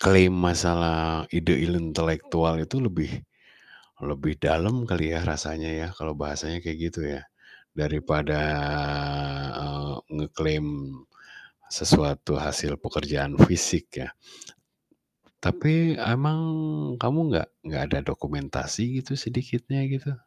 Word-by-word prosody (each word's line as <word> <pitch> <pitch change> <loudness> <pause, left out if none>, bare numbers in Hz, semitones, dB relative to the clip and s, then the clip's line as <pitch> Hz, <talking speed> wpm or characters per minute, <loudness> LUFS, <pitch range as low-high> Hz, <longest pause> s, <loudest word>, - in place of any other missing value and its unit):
klaim 95 -1 +8
masalah 85 -2 +2
ide 85 0 +3
intelektual 80 -1 +1
itu 130 - -4
lebih, 90 - -1 0.9
lebih 75 +1 -2
dalam 85 - +2
kali 80 -2 0
ya 80 - -2
rasanya 80 +1 -3
ya 80 +1 -4
kalau 80 -1 -5
bahasanya 75 +3 -4
kayak 80 -2 -5
gitu 85 - -7 0.2
ya 70 - -11 0.6
daripada, 75 0 0 1.2
eee, 70 0 -5 0.2
ngeklaim 75 0 -1 1.1
sesuatu 70 -2 +3
hasil - - -1
pekerjaan 70 -1 -2 0.2
fisik - - +1
ya. - - -9 1.3
Tapi 160 +1 +3
emang 140 +7 +2 0.6
kamu 130 +7 +2
gak - - +1 0.2
gak - - -3
ada 70 - +1
dokumentasi 75 - -3
gitu 130 +1 -6
sedikitnya 125 +2 -2
gitu? 135 +1 -3
80 Hz, 105 wpm, -26 LUFS, 75-110 Hz, 1.3 s, klaim